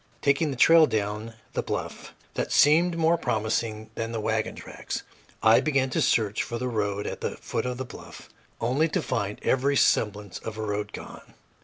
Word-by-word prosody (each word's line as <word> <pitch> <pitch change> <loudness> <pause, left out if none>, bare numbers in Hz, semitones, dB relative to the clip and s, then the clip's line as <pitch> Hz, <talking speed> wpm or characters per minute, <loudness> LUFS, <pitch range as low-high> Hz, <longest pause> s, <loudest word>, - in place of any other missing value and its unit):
Taking 140 +2 +2
a - - -4
trail 165 +4 +7
down 105 +1 -3 0.2
the - - 0
bluff - - -5 0.2
that - - -2
seemed 170 +4 +5
more 165 +1 +3
promising 110 -2 -2
than 115 0 -4
the 115 - -3
wagon 110 0 -1
tracks, - - -6 0.4
I 110 0 +7
began 135 -4 +1
to - - 0
search 105 -2 +2
for 120 - -4
the 125 +2 -2
road 105 -3 -1
at - - -5
the - - -3
foot 115 - -3
of 125 -1 -3
the 130 - -4
bluff, 120 - -11 0.3
only 130 +8 +2
to 160 - -1
find 105 -5 -2
every 135 +2 +2
semblance 105 -6 +1
of 110 -1 -7
a 110 - -3
road 105 0 -3
gone. - - -11
115 Hz, 185 wpm, -26 LUFS, 110-140 Hz, 0.4 s, trail